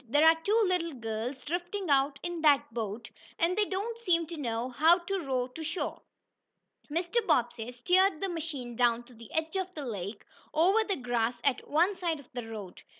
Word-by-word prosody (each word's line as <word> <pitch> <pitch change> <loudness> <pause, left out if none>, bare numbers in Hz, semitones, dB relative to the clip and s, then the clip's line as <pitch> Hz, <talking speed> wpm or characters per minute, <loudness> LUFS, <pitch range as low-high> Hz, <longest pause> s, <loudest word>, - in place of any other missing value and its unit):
"There 290 +5 +5
are 325 0 +6
two 425 +5 +3
little 345 -4 0
girls 230 +3 -4
drifting 355 +2 -2
out 275 0 +3
in 345 -1 -3
that 290 -6 +4
boat, 225 0 -4 0.3
and 345 +2 +2
they 420 0 +3
don't 415 +5 -3
seem 345 -7 +2
to 335 +2 -7
know 240 -4 -2
how 315 +7 +5
to 380 +2 -3
row 260 -6 -1
to 285 +6 -9
shore." 320 +3 -3 0.9
Mr. 345 +9 0
Bobbsey 240 -1 +1
steered 360 +8 +3
the 390 - -1
machine 300 -8 -5
down 240 0 +3
to 245 - -17
the 230 -1 -13
edge 320 +2 -1
of 375 -1 -2
the 295 -3 -5
lake, 205 -2 -5 0.3
over 380 +8 +4
the 405 -3 -1
grass 240 -3 -1
at 275 -3 0
one 345 +7 +3
side 340 -4 -1
of 275 - -16
the 240 -2 -5
road. 210 -5 -8
300 Hz, 195 wpm, -30 LUFS, 240-355 Hz, 0.9 s, are